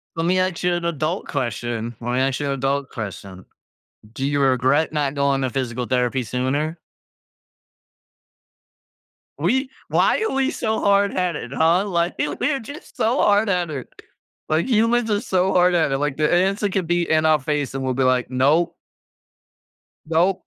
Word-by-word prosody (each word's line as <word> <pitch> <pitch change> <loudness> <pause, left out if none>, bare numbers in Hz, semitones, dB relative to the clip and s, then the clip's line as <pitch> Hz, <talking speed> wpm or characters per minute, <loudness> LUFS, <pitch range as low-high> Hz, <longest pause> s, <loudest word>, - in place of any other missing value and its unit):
Let 165 0 -1
me 185 +2 +2
ask 185 -2 -1
you 180 0 +2
an 175 -1 -2
adult 165 +2 -2
question, 120 -3 -3
let 120 +1 -3
me 125 - +1
ask 135 0 0
you 145 - -2
an 140 - 0
adult 135 0 -1
question. 95 -4 -8 0.7
Do 135 - -3
you 145 0 0
regret 135 +3 +2
not 145 -3 -1
going 140 -1 +1
to 130 - 0
physical 125 -1 -3
therapy 125 +1 0
sooner? 130 +7 -2 2.6
We 260 - +1 0.2
why - - +2
are 445 - -1
we 270 +1 +1
so 220 -1 -1
hardheaded? 185 -9 +1
Huh? 165 +6 +3
Li 175 -3 0 0.3
we're 275 +1 0
just 285 +6 -11
so 235 +5 +1
hardheaded. 180 - +1 0.6
Like, 155 +2 +1
humans 230 -1 +2
are 205 - +2
so 190 -3 +1
hardheaded, 175 -6 +3
like, 145 -1 -1
the 150 0 +1
answer 195 +3 +2
could 185 -3 -2
be 175 0 +1
in 155 0 +2
our 155 -1 +4
face, 145 -1 -2
and 135 - -3
we'll 130 -1 0
be 130 +1 0
like, 130 -1 +1
"Nope." 150 +7 +2 1.3
Nope. 170 +4 +1
155 Hz, 160 wpm, -22 LUFS, 130-185 Hz, 2.6 s, our